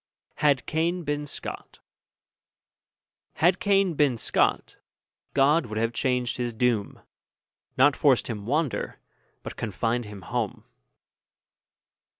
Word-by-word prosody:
HAD 145 Hz, -4 st, +2 dB
CAIN 170 Hz, +3 st, -1 dB
BEEN 145 Hz, -1 st, -2 dB
SCOT -, -, -7 dB, 1.6 s
Had 175 Hz, +3 st, +3 dB
Cain 195 Hz, -3 st, +2 dB
been 140 Hz, -5 st, +2 dB
Scot, -, -, 0 dB, 0.6 s
God 140 Hz, +1 st, +4 dB
would 110 Hz, 0 st, -5 dB
have 115 Hz, +1 st, 0 dB
changed 125 Hz, -1 st, 0 dB
his 120 Hz, -1 st, -2 dB
doom, 115 Hz, -3 st, 0 dB, 0.8 s
Not 140 Hz, +2 st, +5 dB
forced 135 Hz, -5 st, +3 dB
him 105 Hz, -3 st, -6 dB
wander, 150 Hz, +1 st, -1 dB, 0.5 s
but -, -, -7 dB
confined 115 Hz, +3 st, -1 dB
him 105 Hz, -2 st, -10 dB
home. 115 Hz, +1 st, -3 dB
130 Hz, 110 wpm, -26 LUFS, 115-150 Hz, 1.6 s, Not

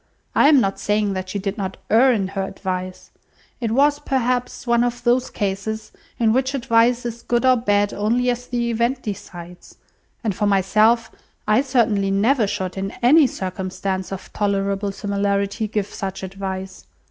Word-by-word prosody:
I 285 Hz, -, +5 dB
am 295 Hz, -3 st, +6 dB
not 195 Hz, -4 st, 0 dB
saying 210 Hz, -1 st, 0 dB
that 185 Hz, 0 st, -4 dB
she 200 Hz, -, -3 dB
did 200 Hz, +2 st, -3 dB
not 190 Hz, -1 st, -4 dB
err 250 Hz, +4 st, +6 dB
in 200 Hz, -5 st, 0 dB
her 195 Hz, 0 st, -3 dB
advice. 185 Hz, -1 st, -5 dB, 0.5 s
It 235 Hz, -3 st, -1 dB
was, 290 Hz, +4 st, +3 dB
perhaps, 250 Hz, -3 st, -1 dB
one 235 Hz, -1 st, +3 dB
of 245 Hz, 0 st, -2 dB
those 245 Hz, +1 st, +2 dB
cases 210 Hz, +2 st, -3 dB, 0.3 s
in 225 Hz, -2 st, +3 dB
which 260 Hz, +2 st, 0 dB
advice 235 Hz, 0 st, +2 dB
is 235 Hz, 0 st, -5 dB
good 240 Hz, +2 st, 0 dB
or 255 Hz, 0 st, +6 dB
bad 205 Hz, -3 st, +1 dB
only 240 Hz, +4 st, +1 dB
as 245 Hz, 0 st, -5 dB
the 235 Hz, -1 st, -1 dB
event 235 Hz, +3 st, 0 dB
decides; 180 Hz, -4 st, -8 dB, 0.5 s
and 215 Hz, -3 st, 0 dB
for 210 Hz, +1 st, 0 dB
myself, 215 Hz, +4 st, +3 dB, 0.4 s
I 215 Hz, +4 st, +4 dB
certainly 225 Hz, -7 st, +1 dB
never 215 Hz, +4 st, +2 dB
should, 185 Hz, -1 st, -4 dB
in 195 Hz, +1 st, -2 dB
any 290 Hz, +4 st, +6 dB
circumstance 190 Hz, -1 st, -4 dB
of 195 Hz, -, -8 dB
tolerable 200 Hz, 0 st, -1 dB
similarity, 200 Hz, +1 st, -1 dB
give 210 Hz, -1 st, -1 dB
such 195 Hz, -1 st, -6 dB
advice. 190 Hz, 0 st, -6 dB
210 Hz, 165 wpm, -21 LUFS, 195-240 Hz, 0.5 s, am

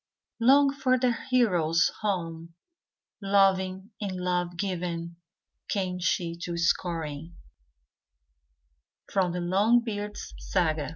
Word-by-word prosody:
Long 275 Hz, +4 st, +5 dB
for 260 Hz, -2 st, +2 dB
their 250 Hz, -1 st, +2 dB, 0.2 s
heroes 175 Hz, -10 st, +3 dB
home; 165 Hz, -5 st, -3 dB, 0.7 s
Loving 195 Hz, 0 st, +2 dB
and 200 Hz, -2 st, -2 dB
love 180 Hz, -1 st, -1 dB
giving, 170 Hz, -3 st, -3 dB, 0.5 s
Came 185 Hz, -3 st, -1 dB
she 175 Hz, -1 st, 0 dB
to 170 Hz, 0 st, -4 dB
Scoring, 165 Hz, -2 st, -1 dB, 1.8 s
—/row 190 Hz, -2 st, +2 dB
The 175 Hz, 0 st, -3 dB
Longbeard's 210 Hz, +3 st, 0 dB
Saga. 155 Hz, -6 st, 0 dB
180 Hz, 95 wpm, -27 LUFS, 170-205 Hz, 1.8 s, Long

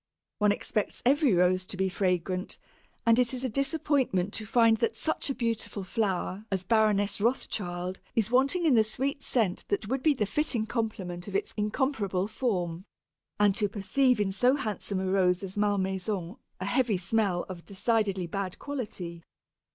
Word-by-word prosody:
One 210 Hz, -1 st, +4 dB
expects 210 Hz, 0 st, -2 dB
every 280 Hz, +1 st, +4 dB
Rose 180 Hz, +1 st, +3 dB
to 190 Hz, -, -5 dB
be 190 Hz, 0 st, +1 dB
fragrant, 185 Hz, 0 st, -1 dB, 0.5 s
and 230 Hz, +1 st, +5 dB
it 250 Hz, +1 st, +2 dB
is 255 Hz, -, -4 dB
a 260 Hz, -, 0 dB
disappointment 270 Hz, -, +1 dB
to 215 Hz, -, -4 dB
find 230 Hz, -1 st, +4 dB
that 230 Hz, -, 0 dB
such 315 Hz, -2 st, -1 dB
a 275 Hz, -, -1 dB
beautiful 230 Hz, -4 st, -2 dB
flower 190 Hz, 0 st, -1 dB
as 190 Hz, -1 st, 0 dB
Baroness 210 Hz, -1 st, +2 dB
Rothschild 185 Hz, -6 st, -1 dB, 0.2 s
is 225 Hz, 0 st, +1 dB
wanting 275 Hz, +8 st, +3 dB
in 305 Hz, -, +5 dB
the 225 Hz, -2 st, +6 dB
sweet 270 Hz, +6 st, -2 dB
scent 220 Hz, -9 st, 0 dB
that 205 Hz, +1 st, -1 dB
would 265 Hz, +1 st, 0 dB
be 305 Hz, -1 st, +3 dB
the 215 Hz, -, 0 dB
fitting 235 Hz, 0 st, 0 dB
complement 205 Hz, -6 st, -3 dB
of 200 Hz, -, -6 dB
its -, -, -1 dB
incomparable 210 Hz, -4 st, 0 dB
form, 185 Hz, -7 st, -2 dB, 0.6 s
and 205 Hz, -1 st, +5 dB
to 205 Hz, 0 st, 0 dB
perceive 245 Hz, +5 st, +2 dB
in 200 Hz, -2 st, +1 dB
so 250 Hz, +7 st, +3 dB
handsome 210 Hz, -6 st, -3 dB
a 190 Hz, -, -2 dB
Rose 185 Hz, -1 st, +2 dB
as 190 Hz, -1 st, -6 dB
Malmaison 195 Hz, -1 st, -1 dB, 0.2 s
a 185 Hz, -, -3 dB
heavy 230 Hz, 0 st, +2 dB
smell 190 Hz, -1 st, 0 dB
of 180 Hz, -3 st, -8 dB
decidedly 205 Hz, -2 st, 0 dB
bad 190 Hz, +1 st, -4 dB
quality. 200 Hz, -11 st, -5 dB
210 Hz, 165 wpm, -29 LUFS, 190-240 Hz, 0.6 s, the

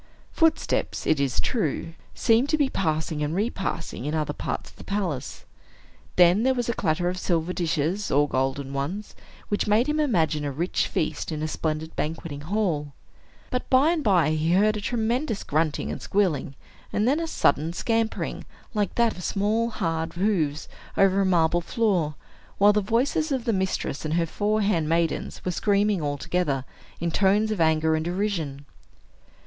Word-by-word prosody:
Footsteps, 325 Hz, -2 st, +1 dB
it 155 Hz, -, +2 dB
is 135 Hz, -3 st, 0 dB
true, 165 Hz, -, -1 dB, 0.2 s
seemed 235 Hz, +4 st, +3 dB
to 310 Hz, -, +2 dB
be 285 Hz, -3 st, +2 dB
passing 155 Hz, -5 st, -1 dB
and 150 Hz, +2 st, -1 dB
repassing, 190 Hz, -, -3 dB
in 150 Hz, +2 st, -1 dB
other 150 Hz, -1 st, -1 dB
parts -, -, -4 dB
of -, -, -24 dB
the -, -, -11 dB
palace. 180 Hz, -10 st, -3 dB, 0.7 s
Then 180 Hz, +3 st, +6 dB
there 260 Hz, +2 st, +2 dB
was 245 Hz, -2 st, -1 dB
a 235 Hz, -, +1 dB
clatter 175 Hz, -3 st, 0 dB
of 180 Hz, +1 st, -2 dB
silver 175 Hz, -1 st, 0 dB
dishes, 170 Hz, +4 st, -1 dB
or 145 Hz, +2 st, +3 dB
golden 135 Hz, +1 st, -1 dB
ones, 170 Hz, +10 st, -4 dB, 0.4 s
which 205 Hz, -, 0 dB
made 215 Hz, +4 st, +4 dB
him 300 Hz, +1 st, 0 dB
imagine 165 Hz, -, +1 dB
a 145 Hz, -, -2 dB
rich 165 Hz, +7 st, -1 dB
feast 155 Hz, +1 st, -2 dB
in 155 Hz, -1 st, -3 dB
a -, -, 0 dB
splendid 155 Hz, 0 st, -3 dB
banqueting 155 Hz, -2 st, -4 dB
hall. 160 Hz, -5 st, -1 dB, 0.6 s
But 250 Hz, -, -2 dB
by 270 Hz, +5 st, +5 dB
and 330 Hz, -3 st, -1 dB
by 175 Hz, -8 st, +3 dB
he 155 Hz, +2 st, +1 dB
heard 210 Hz, +3 st, +4 dB
a 210 Hz, -, -3 dB
tremendous 230 Hz, +1 st, -1 dB
grunting 155 Hz, 0 st, 0 dB
and -, -, -5 dB
squealing, 170 Hz, -9 st, 0 dB, 0.4 s
and 210 Hz, +2 st, +1 dB
then 285 Hz, +5 st, +3 dB
a 335 Hz, -, -2 dB
sudden 155 Hz, -, +2 dB
scampering, 225 Hz, +5 st, -1 dB, 0.3 s
like 210 Hz, -3 st, -1 dB
that 235 Hz, -2 st, +2 dB
of 180 Hz, -, -8 dB
small, 215 Hz, +5 st, +1 dB
hard 165 Hz, -7 st, -2 dB
hoofs 170 Hz, -6 st, 0 dB, 0.3 s
over 195 Hz, 0 st, +4 dB
a -, -, +2 dB
marble 175 Hz, -1 st, +3 dB
floor, 180 Hz, -, 0 dB, 0.4 s
while 205 Hz, +1 st, +6 dB
the 210 Hz, -, +2 dB
voices 260 Hz, +9 st, 0 dB
of 260 Hz, -3 st, -1 dB
the 230 Hz, -, +1 dB
mistress 190 Hz, -6 st, -2 dB
and 155 Hz, 0 st, -1 dB
her 170 Hz, -1 st, +2 dB
four 210 Hz, +5 st, 0 dB
handmaidens 165 Hz, -4 st, 0 dB
were 180 Hz, -, 0 dB
screaming 205 Hz, 0 st, +1 dB
all 145 Hz, -1 st, -1 dB
together, 140 Hz, -5 st, -1 dB, 0.3 s
in 170 Hz, 0 st, -1 dB
tones 205 Hz, +4 st, +3 dB
of 205 Hz, -5 st, -1 dB
anger 160 Hz, 0 st, +3 dB
and 155 Hz, -, -1 dB
derision. 175 Hz, -7 st, -2 dB
180 Hz, 175 wpm, -25 LUFS, 155-215 Hz, 0.7 s, Then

